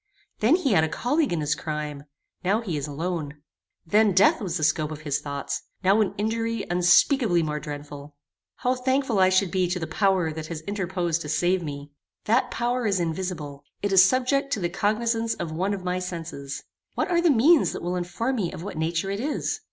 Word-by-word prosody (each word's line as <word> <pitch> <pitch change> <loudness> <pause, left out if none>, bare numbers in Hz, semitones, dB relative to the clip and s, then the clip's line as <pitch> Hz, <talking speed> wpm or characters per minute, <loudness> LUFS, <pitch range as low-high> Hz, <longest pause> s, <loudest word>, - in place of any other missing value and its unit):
Then 235 +9 +4
he 315 -8 0
had 160 -6 +4
a 160 - 0
colleague 285 - 0
in 170 -3 -1
his 150 0 +1
crime; 150 -2 -5 0.4
now 200 +5 +2
he 185 -9 -3
is 145 0 -3
alone. 150 -1 -4 0.4
Then 210 +4 +3
death 190 +2 +4
was 185 -4 -2
the 155 - -3
scope 155 0 +2
of 155 -1 -7
his 145 -2 -1
thoughts; 140 -1 -4 0.2
now 195 +4 +4
an 205 - 0
injury 225 +1 -1
unspeakably 180 - +4
more 150 -1 -2
dreadful. 145 -1 -8 0.4
How 250 - 0
thankful 260 -4 +1
should 185 0 +2
I - - -13
be 185 -2 +1
to 180 - -1
the 165 - -3
power 190 -4 +1
that 155 0 -6
has 160 -2 -6
interposed 180 -3 -2
to 150 - -6
save 180 +4 +1
me! 145 -2 -7 0.3
That 250 +3 +2
power 240 0 -1
is 195 -2 +1
invisible. 160 -4 -4 0.2
It 205 - 0
is 190 -1 +8
subject 260 +5 +2
to - - -1
the 175 -2 -1
cognizance 225 +4 0
of 170 -2 -5
one 185 +5 -1
of 195 -2 -3
my 180 0 -1
senses. 165 -6 -6 0.3
What 385 - -1
are 340 -1 +3
the 345 - +4
means 285 +5 +5
that - - -6
will 175 +1 -1
inform 230 +9 -2
me 185 -6 -1
of 180 -2 -8
what 185 -5 -6
nature 165 +4 -1
it 200 - -3
is? 290 +5 -2
180 Hz, 205 wpm, -25 LUFS, 160-225 Hz, 0.4 s, is